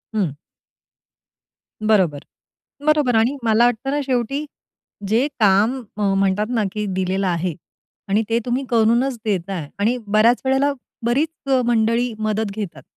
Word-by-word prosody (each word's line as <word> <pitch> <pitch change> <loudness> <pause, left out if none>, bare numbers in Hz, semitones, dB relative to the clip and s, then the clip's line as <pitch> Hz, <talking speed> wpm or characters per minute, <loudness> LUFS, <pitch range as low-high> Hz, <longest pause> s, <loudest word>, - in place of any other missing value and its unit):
हं. 185 -9 0 1.5
बरोबर, 190 -9 +2 0.7
बरोबर. 300 -5 +3
आणि 235 +6 +2
मला 225 +1 +4
वाटत 245 +2 0
ना 290 +1 0
शेवटी 265 +2 -1 0.6
जे 230 +6 +2
काम 215 +6 +3 0.2
म 205 -2 +1
म्हणतात 195 +2 +1
ना 230 -3 +1
कि 210 -1 -3
दिलेलं 190 +1 -1
आहे 175 -1 -1 0.5
आणि 205 +3 +2
ते 230 - +3
तुम्ही 250 +3 -1
करूनचं 235 +3 +2
देताय 185 -6 -2
आणि 220 +5 +1
बऱ्याच 215 +4 +4
वेळेला 270 +2 +2 0.3
बरीच 275 +7 +2 0.2
अ, 260 - +4
मंडळी 235 +1 +1
मदत 215 0 -1
घेतात. 205 -5 -6
220 Hz, 135 wpm, -21 LUFS, 200-245 Hz, 1.5 s, मला